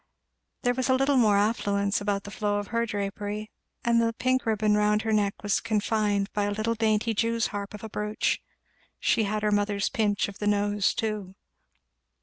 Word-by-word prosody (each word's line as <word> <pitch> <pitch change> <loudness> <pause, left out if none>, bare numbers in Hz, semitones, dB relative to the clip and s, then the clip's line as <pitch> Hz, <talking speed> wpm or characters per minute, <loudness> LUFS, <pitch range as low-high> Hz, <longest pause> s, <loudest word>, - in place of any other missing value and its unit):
There 245 - +3
was 260 +1 -1
a 260 - +5
little 270 +2 +2
more 215 -5 +4
affluence 200 -1 +1
about 200 -1 -1
the 205 - -9
flow 205 -1 -1
of 205 -1 -4
her 235 0 0
drapery, 205 +1 -4 0.3
and 235 -1 +4
the 230 0 +1
pink 255 +1 0
ribbon 215 -1 +2
round 210 0 +2
her 220 -1 0
neck 205 -1 0
was 205 -1 +1
confined 210 -2 0
by 205 -1 0
a 205 - -1
little 215 +2 0
dainty 225 0 +1
Jew's 230 +1 +1
harp 205 0 -5
of 210 - -11
a 220 - -6
brooch; 210 0 -1 0.6
she 220 - +2
had 210 +1 -2
her 210 - +2
mother's 205 0 +1
pinch 205 -2 +1
of 200 - -10
the 210 - -1
nose 205 -1 +1
too. 210 -4 -3
210 Hz, 190 wpm, -27 LUFS, 205-225 Hz, 0.6 s, a